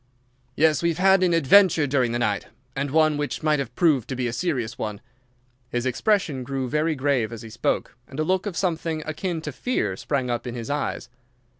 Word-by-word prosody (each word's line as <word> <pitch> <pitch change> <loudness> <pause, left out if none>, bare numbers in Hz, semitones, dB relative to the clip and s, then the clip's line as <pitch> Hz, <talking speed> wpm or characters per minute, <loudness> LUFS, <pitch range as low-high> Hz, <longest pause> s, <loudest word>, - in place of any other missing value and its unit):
"Yes, 155 0 +3
we 170 - +2
have 165 - -2
had 190 +1 +5
an 180 -1 +3
adventure 165 0 +5
during 130 -4 +1
the 120 - 0
night, 105 -4 -1 0.3
and 140 +1 -1
one 155 +1 +3
which 145 +1 -3
might 155 -1 +2
have 125 -3 -5
proved 150 -9 +2
to 130 - -2
be 125 0 -2
a 120 - -2
serious 125 -8 -2
one." 105 -5 -4 0.7
His 120 0 -2
expression 140 - 0
grew 135 0 -3
very 155 +4 0
grave 130 -5 0
as 115 0 -8
he 110 - -10
spoke, 115 +2 -1
and 135 - -9
a - - +2
look 185 +4 0
of 185 -4 -4
something 165 -3 -1
akin 165 +2 -3
to 150 - -5
fear 130 - -1
sprang 130 +5 -2
up 120 +1 -3
in 120 - -5
his 120 +3 -5
eyes. 145 -3 -2
145 Hz, 210 wpm, -24 LUFS, 125-165 Hz, 0.7 s, had